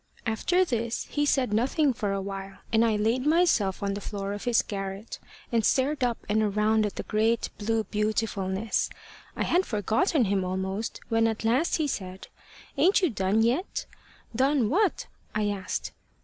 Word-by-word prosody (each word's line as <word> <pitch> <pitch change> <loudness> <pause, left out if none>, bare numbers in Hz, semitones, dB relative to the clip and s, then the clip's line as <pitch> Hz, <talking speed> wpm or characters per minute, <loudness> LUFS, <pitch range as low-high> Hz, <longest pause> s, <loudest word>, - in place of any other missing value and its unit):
After 350 +12 +2
this 235 -5 -2
he 290 0 +1
said 255 -7 +1
nothing 270 +5 +2
for 210 -4 -2
a 195 0 -1
while, 195 0 -6 0.2
and 225 +1 +5
I 225 -2 +2
laid 225 +5 +1
myself 300 - +2
on 200 0 0
the 200 - -5
floor 200 0 -4
of 205 - -6
his 240 -2 +3
garret, 195 +1 -5 0.3
and 230 -2 +2
stared 265 +4 +2
up 240 -2 +1
and 215 +1 +2
around 215 +1 +2
at 205 - -8
the - - -4
great 220 +2 +1
blue 220 +1 0
beautifulness. 210 -1 -1 0.5
I - - -1
had 360 +2 +2
forgotten 230 - +1
him 195 -1 +1
almost, 190 +4 -3
when 225 0 +3
at 225 0 -3
last 255 +9 +2
he 315 - 0
said: 190 -7 -5 0.5
`Ain't 390 +2 +4
you 345 - +3
done 200 +1 +1
yet?' 255 - 0 0.5
`Done 265 -2 +2
what?' 390 +5 +1 0.3
I 210 -1 +1
asked. 200 -2 -3
220 Hz, 170 wpm, -27 LUFS, 200-255 Hz, 0.5 s, and